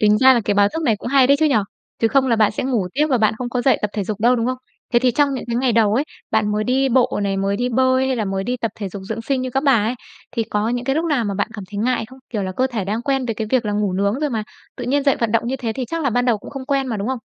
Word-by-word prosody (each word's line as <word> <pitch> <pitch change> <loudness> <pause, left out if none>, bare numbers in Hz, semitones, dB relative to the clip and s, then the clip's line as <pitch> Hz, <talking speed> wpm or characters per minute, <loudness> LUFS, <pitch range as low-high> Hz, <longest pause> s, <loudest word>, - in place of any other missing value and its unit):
Tính 210 0 +4
ra 260 0 +7
là 235 - +2
cái 205 - +1
báo 200 0 +4
thức 325 +6 -4
này 230 -8 +2
cũng 235 - -6
hay 270 -1 +5
đấy 280 +2 +5
chứ 310 - +4
nhỉ. 280 - +2 0.4
Chứ 225 - +2
không 270 +1 +2
là 235 -3 +2
bạn 215 -1 +3
sẽ - - -3
ngủ 235 -8 0
tiếp 300 +3 +2
và 255 - +3
bạn 215 -1 +2
không 250 -1 -3
có 245 0 -2
dậy 265 - +3
tập 210 - -1
thể 205 -3 -1
dục 210 +1 -4
đâu, 245 +3 +4
đúng 230 +1 0
không? 255 0 -2 0.3
Thế 240 - +6
thì 250 0 +2
trong 280 +2 +1
những 255 - -5
cái 235 0 -2
ngày 250 -1 +1
đầu 215 -2 +3
ấy, 275 +6 +1 0.3
bạn 210 -1 +1
mới 215 0 0
đi 265 +3 +2
bộ 250 -3 +2
này, 195 -1 -1
mới 195 +1 0
đi 245 +2 -1
bơi 260 +1 +2
hay 260 -1 0
là 215 - -1
mới 195 0 -2
đi 250 +4 -1
tập 230 -2 -2
thể 200 - -3
dục 190 +1 -8
dưỡng 230 - -4
sinh 265 +1 -1
như 255 - -3
các 270 +3 0
bà 275 -2 +4
ấy, 225 +1 +2 0.4
thì 230 - 0
có 210 0 -1
những 245 0 -2
cái 270 +2 0
lúc 330 - 0
nào 285 -8 +1
mà 200 -1 -2
bạn 200 +3 -1
cảm 205 - -7
thấy 205 - -5
ngại 240 0 0
không? 260 +2 -15
Kiểu 210 -4 -1
là 185 0 -3
cơ 260 - +2
thể 225 -7 -3
đang 215 +4 -2
quen 270 -1 0
với 230 - -2
cái 220 0 -3
việc 255 -2 +2
là 205 - -1
ngủ 205 -2 0
nướng 200 +2 +1
rồi 300 -2 0
mà, 220 -2 -1 0.3
tự - - -5
nhiên 280 +3 +1
dậy 280 - +3
vận 230 -3 0
động 230 0 +1
như 265 +2 -1
thế 230 -3 -3
thì 255 +1 -3
chắc 330 +4 -4
là 275 - +1
ban 245 +2 +1
đầu 235 -4 +2
cũng - - -11
không 270 -2 -7
quen 275 -2 0
mà, 230 -4 -2
đúng 205 +4 -3
không? 260 -2 -2
240 Hz, 355 wpm, -20 LUFS, 210-260 Hz, 0.4 s, ra